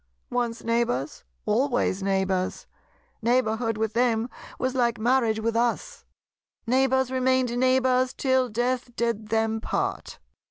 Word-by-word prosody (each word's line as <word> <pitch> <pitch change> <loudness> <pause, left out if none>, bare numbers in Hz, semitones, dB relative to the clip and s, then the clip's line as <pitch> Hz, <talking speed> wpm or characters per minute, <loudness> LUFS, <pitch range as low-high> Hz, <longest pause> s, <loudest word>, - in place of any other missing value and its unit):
Once 235 -2 -2
neighbours, 230 - -1 0.2
always 240 -3 +1
neighbours. 190 -1 -1 0.6
Neighbourhood 225 -1 +1
with 220 0 -1
them 235 0 +1 0.3
was 255 0 -1
like 240 -2 +1
marriage 230 -1 +2
with 225 +1 -1
us. 235 0 -1 0.6
Neighbours 265 +1 +2
remained 260 -1 +1
neighbours 255 0 +2
till 260 -2 +1
death 245 +2 -2
did 230 -2 -1
them 225 0 0
part. - - -3
235 Hz, 115 wpm, -25 LUFS, 220-255 Hz, 0.6 s, marriage